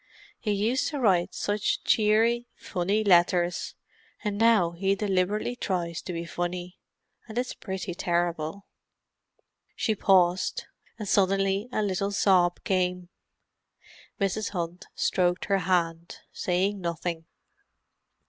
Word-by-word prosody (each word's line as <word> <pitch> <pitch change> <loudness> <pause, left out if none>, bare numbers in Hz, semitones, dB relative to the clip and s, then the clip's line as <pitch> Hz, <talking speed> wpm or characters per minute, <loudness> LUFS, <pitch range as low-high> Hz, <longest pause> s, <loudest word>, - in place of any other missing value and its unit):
He 215 - -4
used 220 +6 +1
to 295 -3 -3
write 190 -8 +2
such 205 +1 -1
cheery, 225 +3 +3
funny 195 +5 -1
letters, 175 -2 +3 0.5
and 210 -2 -1
now 215 -5 +4
he 195 +3 0
deliberately 205 +3 0
tries 175 -7 -2
to - - -6
be 170 -1 -4
funny—and 180 +6 -7
it's 250 +1 -1
pretty 190 -2 -5
terrible." 175 +1 -1 1.1
She 220 - 0
paused, 185 -3 +2 0.3
and 210 -2 -6
suddenly 195 +3 +2
a 215 - 0
little 200 0 -1
sob 185 -3 +3
came. 180 -2 0 1.1
Mrs. 200 +1 0
Hunt 175 0 -5
stroked 180 -1 +1
her 195 -1 +2
hand, 170 -2 -1
saying 190 +3 0
nothing. 170 -1 -3
190 Hz, 110 wpm, -27 LUFS, 175-205 Hz, 1.1 s, now